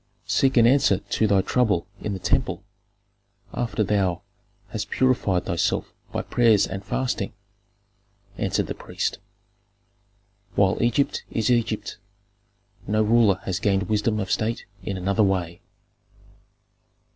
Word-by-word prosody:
"Seek 135 -1 +2
an 115 - +7
answer 130 -5 +4
to 110 - -1
thy 100 -2 +4
trouble 105 -4 +1 0.2
in 105 - -3
the - - -3
temple, 95 - 0 0.9
after 115 -2 -1
thou 95 -4 0 0.5
hast - - -4
purified 115 -9 +1
thyself 85 0 -1 0.2
by - - -2
prayers 115 -4 +3
and 95 +1 -6
fasting," 125 -2 -2 1.0
answered - - 0
the - - -4
priest. - - -3 1.4
"While 95 0 +2
Egypt 120 +4 +1
is 110 +1 0
Egypt, 110 -4 -1 0.9
no 110 +2 +2
ruler 110 -4 +3
has 90 -2 -2
gained 100 -1 +1
wisdom 105 0 +1
of 95 -3 -3
state 115 +2 -1 0.2
in 95 0 -4
another 100 +4 0
way." 90 -4 0
105 Hz, 120 wpm, -24 LUFS, 95-115 Hz, 1.4 s, an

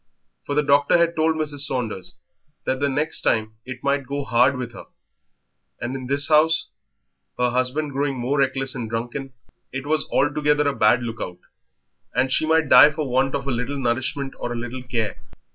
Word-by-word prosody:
For 145 - -2
the 150 - +3
doctor 145 +3 +4
had 170 0 +2
told 160 0 +2
Mrs. 150 -2 -3
Saunders 125 -9 -2 0.5
that 130 0 -1
the 140 0 +1
next 150 +4 0
time 110 -1 0
it 125 0 -8
might 140 -1 0
go 140 +1 -3
hard 125 +1 +3
with 125 -2 -5
her; - - -10 0.9
and 120 +3 -4
in 130 -1 -6
this 140 +1 +1
house, 160 +1 +3 0.7
her 125 0 +1
husband 130 +4 -1
growing 140 0 -1
more 130 +4 -1
reckless 135 -1 0
and 120 -4 -5
drunken, 120 +4 -4 0.4
it 135 +1 -5
was 155 0 0
altogether 150 +1 +2
a 140 - 0
bad 120 +3 +3
look 115 -1 -5
out, 90 - -5 0.8
and 130 +2 +1
she 155 - +1
might 160 -1 +3
die 130 +3 +9
for 150 -1 -4
want 130 +2 +1
of 135 - -4
a - - 0
little 125 +4 -2
nourishment 130 +2 -1
or 120 - -4
a - - -3
little 120 +2 -6
care. 115 -5 -3
135 Hz, 190 wpm, -22 LUFS, 125-145 Hz, 0.9 s, die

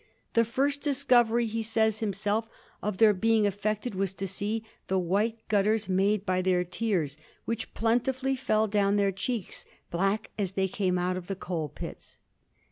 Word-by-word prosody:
"The 230 0 +4
first 280 +5 0
discovery," 245 -5 +3
he 225 +1 -2
says 220 -1 +1
himself, 210 +1 -1 0.3
"of 210 -2 -2
their 220 -1 +6
being 220 +2 +3
affected 210 +3 -1
was 195 0 -1
to 195 - -4
see 205 +4 -2 0.2
the 190 - +1
white 205 +6 0
gutters 210 +1 +2
made 195 +2 +2
by 185 -1 +1
their 180 -1 +2
tears, 175 -6 -1 0.3
which 230 -1 -4
plentifully 260 +4 +1
fell 220 -4 +1
down 200 -1 +2
their 200 -1 +3
cheeks, 195 +2 -3 0.3
black 195 +5 0
as 195 -2 -1
they 190 0 +1
came 185 -1 0
out 180 +1 0
of 180 -1 -7
the 195 - -2
coal 170 -5 -3
pits." - - -9
210 Hz, 165 wpm, -28 LUFS, 190-225 Hz, 0.3 s, their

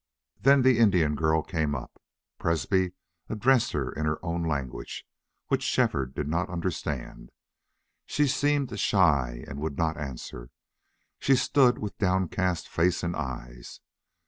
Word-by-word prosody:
Then 135 +5 +5
the 130 -3 +4
Indian 90 -9 +4
girl 80 +1 +1
came 80 -4 -1
up. 65 - -8 0.4
Presbrey 90 +3 +1 0.4
addressed 120 +2 +3
her 70 -4 -1
in 75 0 -2
her 75 0 0
own 85 0 -1
language, 70 -6 -4 0.4
which - - +1
Shefford 65 -1 0
did 75 - -2
not 85 +5 -1
understand. 85 -3 -4 0.8
She 150 - +2
seemed 145 0 0
shy 70 - +2
and 70 - -7
would 75 -2 -3
not 80 -1 0
answer; 65 -4 -7 0.7
she 135 - +4
stood 125 0 +4
with 105 -2 -6
downcast 95 -2 0
face 90 +2 +1
and 85 0 -1
eyes. - - -6
85 Hz, 135 wpm, -27 LUFS, 75-100 Hz, 0.8 s, Then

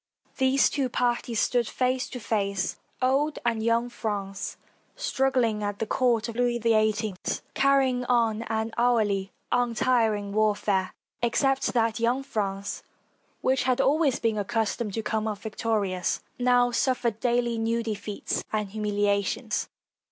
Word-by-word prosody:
These 265 +1 +3
two 275 -4 0
parties 240 -2 0
stood 240 0 +2
face 255 0 0
to 250 - -6
face, 200 -4 -1 0.3
old 280 +4 +2
and 230 -2 +1
young 230 +1 +2
France, 200 -4 -4 0.4
struggling 265 - +1
at 205 -1 -2
the 225 - -2
court 235 -1 +1
of 230 - -6
Louis 245 0 +1
XVIII, 215 -2 +2 0.4
carry 275 -1 +4
ing 250 0 -2
on 230 -3 +2
an 220 0 -1
hourly, 210 -5 +2 0.2
untiring 230 -4 +1
warfare, 205 -3 +1 0.3
except 265 +3 +1
that 230 -1 +2
young 240 +4 +1
France, 200 -6 -3 0.6
which 260 -1 +1
had 255 -1 +2
always 285 0 +3
been 225 -2 0
accustomed 210 +1 -1
to 225 - -2
come 220 0 -1
off 205 -2 -4
victorious, 210 -4 -1 0.2
now 245 0 +4
suffered 240 -3 0
daily 240 -1 +1
new 230 +1 0
defeats 210 -2 -3
and 210 -2 -1
humil 210 -1 -1
iations. 205 +3 0
230 Hz, 135 wpm, -27 LUFS, 210-245 Hz, 0.6 s, carry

